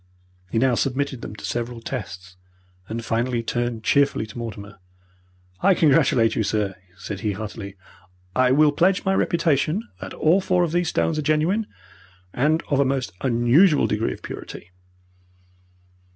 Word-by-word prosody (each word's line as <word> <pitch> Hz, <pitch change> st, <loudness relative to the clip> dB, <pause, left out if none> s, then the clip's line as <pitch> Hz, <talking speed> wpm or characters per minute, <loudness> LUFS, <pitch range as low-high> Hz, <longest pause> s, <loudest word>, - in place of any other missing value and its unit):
He 115 Hz, -, -2 dB
now 130 Hz, +2 st, +3 dB
submitted 135 Hz, +1 st, -1 dB
them -, -, -7 dB
to -, -, -8 dB
several 120 Hz, 0 st, -3 dB
tests, 95 Hz, -7 st, -7 dB, 0.5 s
and 115 Hz, +1 st, -4 dB
finally 120 Hz, +1 st, -1 dB
turned 120 Hz, -1 st, -2 dB
cheerfully 140 Hz, -5 st, +2 dB
to 105 Hz, +2 st, -12 dB
Mortimer. 100 Hz, -3 st, -8 dB, 0.8 s
"I 195 Hz, -1 st, +4 dB
congratulate 135 Hz, -8 st, +3 dB
you, -, -, +1 dB
sir," 105 Hz, -2 st, -1 dB, 0.2 s
said 100 Hz, +1 st, -6 dB
he, 105 Hz, -2 st, -1 dB
heartily. 100 Hz, -1 st, -7 dB, 0.6 s
"I 130 Hz, 0 st, +4 dB
will 150 Hz, +2 st, +5 dB
pledge 185 Hz, +7 st, +2 dB
my 190 Hz, -, +2 dB
reputation 170 Hz, -, +1 dB
that -, -, -7 dB
all 170 Hz, +5 st, +3 dB
four 185 Hz, -1 st, +2 dB
of 170 Hz, -, -1 dB
these 175 Hz, 0 st, +1 dB
stones 155 Hz, -1 st, 0 dB
are -, -, 0 dB
genuine, 155 Hz, +9 st, +1 dB, 0.7 s
and 155 Hz, +6 st, +1 dB
of 140 Hz, -, +2 dB
a -, -, +5 dB
most 135 Hz, -7 st, -1 dB
unusual 130 Hz, +7 st, +4 dB
degree 110 Hz, +2 st, -1 dB
of -, -, -13 dB
purity." 90 Hz, -, -9 dB
130 Hz, 150 wpm, -23 LUFS, 110-155 Hz, 0.8 s, will